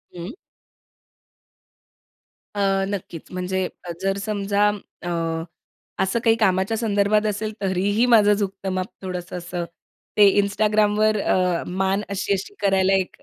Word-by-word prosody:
हं. 175 - -7 2.2
अ, 205 - -3 0.3
नक्कीच. 180 -5 -6
म्हणजे 185 +1 -2 0.2
अ, 175 - -5
जर 195 0 0
समजा 205 -1 +1 0.4
अ, 175 - -3 0.9
असं 190 +5 0
काही 225 -1 +5
कामाच्या 195 0 +1
संदर्भात 210 -1 +2
असेल 215 +1 -1
तरीही 200 +4 +1
माझं 210 -2 +6
झुकतं 195 -1 -3
माप 185 0 -1 0.2
थोडंसं 180 -1 -5
असं, 175 0 -4 0.5
ते 205 -1 +8
Instagramवर 210 +1 +2
अ, 180 -3 +1
मान 190 +2 0
अशी-अशी 200 - -2
करायला 195 -1 +3
एक 190 -1 0
195 Hz, 120 wpm, -23 LUFS, 185-210 Hz, 2.2 s, ते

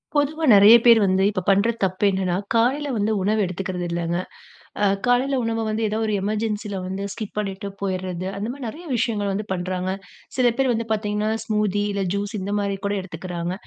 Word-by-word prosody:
பொதுவா 300 +3 +1
நெறைய 205 +3 +9
பேர் 230 -2 +8
வந்து 190 0 +2
இப்ப 195 -3 -2
பண்ற 200 +4 +4
தப்பு 185 +1 -1
என்னான்னா, 185 -2 0 0.2
காலைல 260 +6 +2
வந்து 210 +1 +1
உணவு 210 +3 +1
எடுத்துக்கறது 180 0 -4
இல்லங்க. 170 0 -1 0.7
அ - - +5 0.2
காலைல 260 +3 +2
உணவ 225 0 -1
வந்து 220 +1 -1
ஏதாவது 220 +1 -1
ஒரு 215 - 0
எமர்ஜென்சில 210 -1 -2
வந்து, 190 +1 -4
ஸ்கிப் 215 -2 -7
பண்ணிட்டு 200 -1 -3
போயிர்றது, 185 -2 -3
அந்த 205 +2 -3
மாரி 275 -2 -7
நெறைய 320 +10 -8
விஷயங்கள் 210 -4 0
வந்து 205 +2 -3
பண்றாங்க. 185 0 -2 0.5
சில 245 -2 +4
பேர் 265 -2 +3
வந்து 230 0 -2
பாத்தீங்கன்னா, 210 0 -1
ஸ்மூத்தி 210 -2 0
இல்ல 200 -1 -1
ஜூஸ் 205 +1 -3
இந்த 200 +2 -3
மாரி 200 -1 -2
கூட 205 - -1
எடுத்துக்குறாங்க. 175 -1 -5
205 Hz, 180 wpm, -23 LUFS, 190-225 Hz, 0.7 s, நெறைய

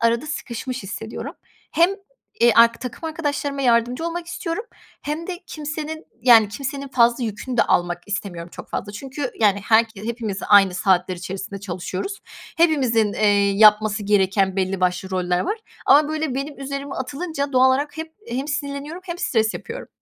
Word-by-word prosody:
arada 230 +5 +2
sıkışmış 255 -3 -5
hissediyorum. 215 +3 -6 0.4
Hem, 340 +2 +4 0.5
eee, 235 0 +6
ark 230 0 +6
takım 250 +5 -7
arkadaşlarıma 290 -3 -2
yardımcı 245 +4 +2
olmak 335 0 -4
istiyorum 345 +4 -4 0.4
hem 305 +3 -4
de 360 -2 -5
kimsenin 310 +1 -5 0.2
yani, 230 -4 +7
kimsenin 275 +5 -5
fazla 240 -1 +3
yükünü 230 +4 -4
de - - +6
almak 175 0 0
istemiyorum 185 -4 -4
çok - - -10
fazla 205 - -4
çünkü, 265 +4 -5
yani, 205 -2 +4
herke 220 -2 +2
hepimiz 225 -4 -3
aynı 195 -3 +6
saatler 185 -1 +2
içerisinde 195 +3 -6
çalışıyoruz. 190 - -5 0.4
Hepimizin, 255 -10 +3
eee, 205 -1 +3
yapması 210 +1 +5
gereken 195 -1 +2
belli 190 0 -1
başlı 180 +1 0
roller 180 -1 0
var 420 +4 -2 0.3
ama 295 +1 +6
böyle 310 -3 -2
benim 275 +2 -5
üzerime 275 0 -5
atılınca 280 +2 -3
doğal 255 0 +5
olarak 285 +3 0
hep 320 0 -7
hem 260 +5 -3
sinirleniyorum 285 +3 -4
hem 345 -1 -5
stres 220 -10 +1
yapıyorum. - - -7
235 Hz, 155 wpm, -22 LUFS, 205-290 Hz, 0.5 s, yani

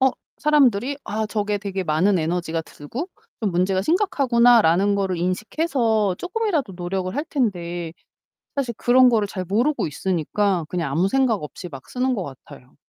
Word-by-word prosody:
어 265 0 +5 0.3
사람들이 275 -3 +3
'아 215 +1 -2
저게 210 -1 -1
되게 195 -2 -3
많은 180 +5 +2
에너지가 165 0 -1
들고 230 - -7 0.3
좀 215 -3 0
문제가 185 +2 +1
심각하구나.'라는 235 - +4
거를 190 -2 -1
인식해서 220 - 0
쪼끔이라도 360 - -1
노력을 185 +1 -3
할 290 +4 -1
텐데 175 - -2 0.6
사실 265 -4 -1
그런 250 +1 +5
거를 215 -4 +2
잘 185 -2 -4
모르고 240 - +1
있으니까 180 +3 -1
그냥 165 -6 -2
아무 170 +6 +2
생각 255 -7 +2
없이 175 +4 -8
막 135 -4 -11
쓰는 255 +1 0
것 200 - -2
같아요. 135 -2 -12
205 Hz, 350 characters per minute, -22 LUFS, 175-250 Hz, 0.6 s, 어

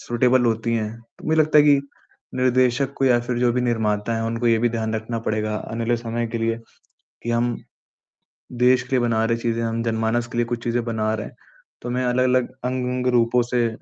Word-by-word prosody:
...suitable 125 +1 +2
होती 115 +1 0
हैं, 110 -1 -2 0.2
तो - - -13
मुझे 160 0 +2
लगता 155 0 +4
है 145 - +6
कि 145 - +6 0.6
निर्देशक 130 +1 +2
को 135 - 0
या 125 -2 +4
फिर 120 0 -3
जो 120 0 +3
भी 125 - 0
निर्माता 110 -2 0
हैं 115 - -2
उनको 115 +1 -2
ये 115 -1 +4
भी 120 +1 +2
ध्यान 110 -1 -2
रखना 110 +1 -3
पड़ेगा 110 0 -1 0.2
आने 115 0 -2
वाले 120 +1 +1
समय 115 0 -3
के 115 - -1
लिए 115 0 0 0.7
कि 120 - -3
हम 120 0 +1 1.1
देश 125 0 +5
के 125 - -18
लिए - - +3
बना 115 -2 +1
रहे 115 0 +1
चीजें, 115 0 -1
हम 115 0 -2
जनमानस 115 +1 0
के 120 - -7
लिए 120 - +2
कुछ 115 0 -4
चीज़ें 120 0 0
बना 110 -2 -1
रहे 110 -1 -3
हैं, - - -15 0.5
तो 120 - -5
हमें 125 +1 -1
अलग-अलग 125 0 +2
अंग-अंग 125 0 -1
रूपों 120 +1 +3
से 120 -1 0
120 Hz, 215 wpm, -22 LUFS, 115-125 Hz, 1.1 s, है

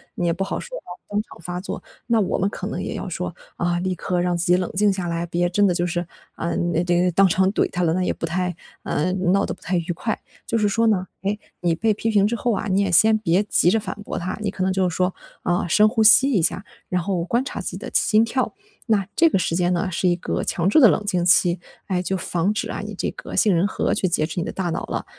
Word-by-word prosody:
你 175 - -2
也 170 - +2
不 195 - -2
好 195 - -3
说 - - -8
要 - - -6 0.3
当 205 +1 0
场 - - -15
发 180 +2 -5
作， - - -6 0.3
那 230 -2 +3
我 190 - 0
们 195 +2 +1
可 - - -6
能 - - -4
也 - - -4
要 - - -5
说， - - -4 0.2
啊， 175 0 0
立 185 +1 -1
刻 180 0 -2
让 175 0 0
自 170 +1 -1
己 180 - +5
冷 185 - -2
静 205 +2 +3
下 185 -2 -3
来， 170 0 -2
别 175 +1 0
真 205 +3 +3
的 180 - +2
就 175 0 0
是， 175 0 -2 0.3
啊， 170 - -3
那 175 0 0
这 175 0 +2
个 180 - +2
当 195 +3 +5
场 190 +1 +2
怼 - - +1
他 180 -1 -2
了， 160 - +2
那 185 +1 0
也 - - 0
不 - - -4
太 180 +1 -2 0.3
呃， 180 +5 -1
闹 190 +1 +1
得 - - -3
不 - - -16
太 180 +2 -1
愉 175 +1 -2
快。 215 +6 -3 0.3
就 230 - 0
是 210 - +2
说 225 +3 +2
呢， 190 -4 +1
哎， 200 +2 -1 0.2
你 170 -2 +1
被 220 +6 +1
批 225 +2 -2
评 205 -2 +3
之 230 +3 0
后 240 +2 -1
啊， 215 - -2
你 195 +1 +2
也 195 - 0
先 220 +6 +6
别 190 -2 +1
急 185 -4 +3
着 225 - +2
反 195 -3 -5
驳 - - -5
他， 180 +2 -3
你 210 - -1
可 190 -1 -3
能 185 0 +1
就 185 -1 +1
是 175 - -6
说， 185 0 +1 0.3
啊， 175 0 0
深 210 +6 +5
呼 225 0 0
吸 260 +6 +7
一 200 - +2
下， 190 +4 0 0.2
然 180 -1 0
后 175 -1 -1
观 240 +8 0
察 - - -5
自 - - -5
己 - - -7
的 - - -8
心 220 +1 +4
跳。 255 +7 -2 0.3
那 205 -5 +1
这 330 0 +5
个 195 - +1
时 165 - -1
间 175 0 +1
呢 185 +2 -1
是 180 0 +1
一 175 - +2
个 - - -3
强 170 0 -1
制 - - +3
的 255 -8 +8
冷 210 - 0
静 180 -4 0
期， 175 0 +5 0.3
哎， 185 -2 -1
就 190 +1 -2
防 180 +2 -1
止 215 - -3
啊 - - -4
你 - - -7
这 - - -2
个 - - -10
杏 205 -5 +4
仁 170 +3 +2
核 205 - -1
去 185 -3 0
劫 155 -3 +1
持 165 +2 -4
你 - - -1
的 - - -4
大 180 -3 -2
脑 165 - -3
了， - - -3
185 Hz, 305 characters per minute, -22 LUFS, 175-205 Hz, 0.3 s, 的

